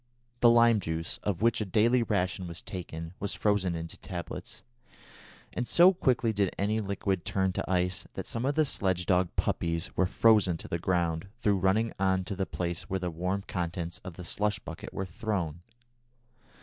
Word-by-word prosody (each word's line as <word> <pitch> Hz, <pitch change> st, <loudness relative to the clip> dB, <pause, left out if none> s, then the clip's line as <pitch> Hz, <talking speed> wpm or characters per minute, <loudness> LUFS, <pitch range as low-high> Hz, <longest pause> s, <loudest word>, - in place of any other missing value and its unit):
The 120 Hz, -, +7 dB
lime 115 Hz, -1 st, +6 dB
juice, 80 Hz, -2 st, -3 dB
of 100 Hz, -1 st, -2 dB
which 115 Hz, -1 st, +3 dB
a -, -, +2 dB
daily 110 Hz, +5 st, +3 dB
ration 95 Hz, -4 st, -1 dB
was 85 Hz, -1 st, -6 dB
taken, 80 Hz, -2 st, -6 dB
was 100 Hz, -, -2 dB
frozen 105 Hz, -4 st, +1 dB
into 80 Hz, 0 st, -5 dB
tablets, 85 Hz, -3 st, -7 dB, 0.9 s
and 120 Hz, -, -2 dB
so 180 Hz, +3 st, +7 dB
quickly 125 Hz, -9 st, +1 dB
did 100 Hz, -3 st, 0 dB
any 105 Hz, +3 st, +1 dB
liquid 100 Hz, -2 st, -1 dB
turn 95 Hz, +1 st, 0 dB
to -, -, -3 dB
ice 90 Hz, 0 st, 0 dB
that -, -, -4 dB
some 115 Hz, -, -3 dB
of 140 Hz, +2 st, +1 dB
the 155 Hz, -1 st, +4 dB
sledge 95 Hz, -9 st, 0 dB
dog 90 Hz, -1 st, +3 dB
puppies 85 Hz, -1 st, -1 dB
were 95 Hz, -, +3 dB
frozen 105 Hz, -5 st, +4 dB
to -, -, -9 dB
the 85 Hz, -, -2 dB
ground 85 Hz, -1 st, 0 dB
through 105 Hz, -5 st, +2 dB
running 105 Hz, +5 st, +2 dB
on 95 Hz, -1 st, +2 dB
to 95 Hz, -, -4 dB
the 95 Hz, 0 st, -2 dB
place 85 Hz, -1 st, -3 dB
where 95 Hz, -, 0 dB
the 90 Hz, -1 st, -2 dB
warm 90 Hz, +4 st, -2 dB
contents 85 Hz, -1 st, -3 dB
of 90 Hz, -4 st, -9 dB
the 90 Hz, -, -8 dB
slush 105 Hz, +5 st, 0 dB
bucket -, -, -8 dB
were 95 Hz, -, -3 dB
thrown. 90 Hz, -3 st, -3 dB
95 Hz, 185 wpm, -29 LUFS, 85-105 Hz, 0.9 s, The